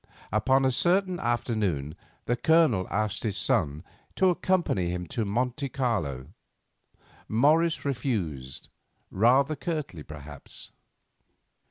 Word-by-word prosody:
Upon 130 Hz, +6 st, +3 dB
a 130 Hz, -, +3 dB
certain 180 Hz, +6 st, +1 dB
afternoon 110 Hz, -, -1 dB, 0.3 s
the 120 Hz, -, +1 dB
Colonel 125 Hz, -, +3 dB
asked 105 Hz, +1 st, -1 dB
his 105 Hz, -4 st, -2 dB
son 75 Hz, +2 st, +1 dB, 0.3 s
to 190 Hz, -1 st, +4 dB
accompany 175 Hz, -, 0 dB
him 90 Hz, 0 st, -3 dB
to 115 Hz, -, -2 dB
Monte 125 Hz, +6 st, -1 dB
Carlo. 95 Hz, -, -2 dB, 0.9 s
Morris 155 Hz, +9 st, +2 dB
refused, 90 Hz, -, -3 dB, 0.4 s
rather 130 Hz, +8 st, +3 dB
curtly, 150 Hz, -, -4 dB
perhaps. 75 Hz, 0 st, -11 dB
120 Hz, 100 wpm, -27 LUFS, 90-140 Hz, 0.9 s, to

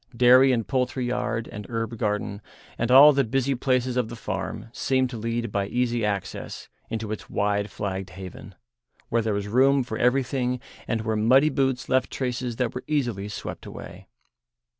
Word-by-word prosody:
Dairy 130 Hz, +2 st, +7 dB
and 115 Hz, -3 st, 0 dB
poultry 130 Hz, -1 st, -1 dB
yard, 120 Hz, -2 st, -2 dB
and 105 Hz, 0 st, -7 dB
herb 115 Hz, -1 st, -3 dB
garden, 105 Hz, -2 st, -2 dB, 0.3 s
and 120 Hz, -, -1 dB
all 140 Hz, +4 st, +9 dB
the 140 Hz, 0 st, +3 dB
busy 135 Hz, +3 st, 0 dB
places 125 Hz, -1 st, 0 dB
of 120 Hz, -3 st, 0 dB
the 120 Hz, -, -7 dB
farm 115 Hz, -, -5 dB
seemed 130 Hz, 0 st, +1 dB
to 120 Hz, -, -5 dB
lead 115 Hz, 0 st, -2 dB
by 100 Hz, -1 st, -1 dB
easy 120 Hz, 0 st, 0 dB
access 100 Hz, -2 st, -4 dB, 0.2 s
into 110 Hz, -2 st, -4 dB
its 110 Hz, -, -6 dB
wide 100 Hz, 0 st, 0 dB
flagged 95 Hz, -1 st, -4 dB
haven, 95 Hz, +1 st, -10 dB, 0.5 s
where 115 Hz, 0 st, +2 dB
there 110 Hz, -2 st, -1 dB
was 100 Hz, 0 st, -3 dB
room 135 Hz, +5 st, +4 dB
for 110 Hz, -3 st, -5 dB
everything 125 Hz, 0 st, +1 dB, 0.3 s
and 115 Hz, -, -1 dB
where 110 Hz, 0 st, -1 dB
muddy 130 Hz, +8 st, +5 dB
boots 135 Hz, -3 st, 0 dB
left 130 Hz, -1 st, +2 dB
traces 125 Hz, -2 st, -3 dB
that 125 Hz, -1 st, -1 dB
were -, -, -5 dB
easily 120 Hz, -10 st, -1 dB
swept 105 Hz, -, -7 dB
away. 95 Hz, +3 st, -10 dB
120 Hz, 175 wpm, -25 LUFS, 105-130 Hz, 0.5 s, all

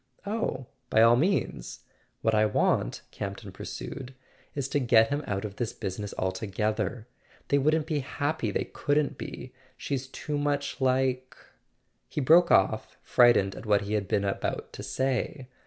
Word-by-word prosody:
"Oh, 200 Hz, -, -2 dB, 0.2 s
by 110 Hz, -, +5 dB
all 115 Hz, +1 st, +7 dB
means. 165 Hz, -, -1 dB, 0.4 s
What 110 Hz, -, +2 dB
I 110 Hz, 0 st, +4 dB
want," -, -, +1 dB
Campton -, -, -6 dB
pur¬ -, -, -8 dB
sued, 130 Hz, 0 st, -7 dB, 0.4 s
"is 140 Hz, -2 st, -1 dB
to 145 Hz, -, +1 dB
get 115 Hz, -3 st, +5 dB
him 145 Hz, +1 st, -1 dB
out 100 Hz, 0 st, -2 dB
of 100 Hz, -1 st, -7 dB
this 120 Hz, -3 st, -2 dB
business 100 Hz, +2 st, -5 dB
altogether. 105 Hz, +4 st, -2 dB, 0.4 s
They 140 Hz, -, +4 dB
wouldn't 155 Hz, +2 st, +2 dB
be 155 Hz, -2 st, -1 dB
happy—they 145 Hz, +3 st, -2 dB
couldn't 145 Hz, -1 st, 0 dB
be. 125 Hz, 0 st, -7 dB, 0.2 s
She's 135 Hz, -2 st, -3 dB
too 145 Hz, +2 st, -4 dB
much 145 Hz, -1 st, -1 dB
like 130 Hz, 0 st, +1 dB, 0.3 s
" -, -, -46 dB
He -, -, -3 dB
broke 165 Hz, +5 st, +6 dB
off, 95 Hz, -, +2 dB
frightened 120 Hz, -6 st, +4 dB
at 110 Hz, -, -9 dB
what 105 Hz, -1 st, +4 dB
he 100 Hz, +1 st, -4 dB
had 105 Hz, -3 st, 0 dB
been 100 Hz, -1 st, +1 dB
about 100 Hz, -, -3 dB
to -, -, -7 dB
say. 130 Hz, 0 st, -2 dB
130 Hz, 160 wpm, -28 LUFS, 105-145 Hz, 0.4 s, all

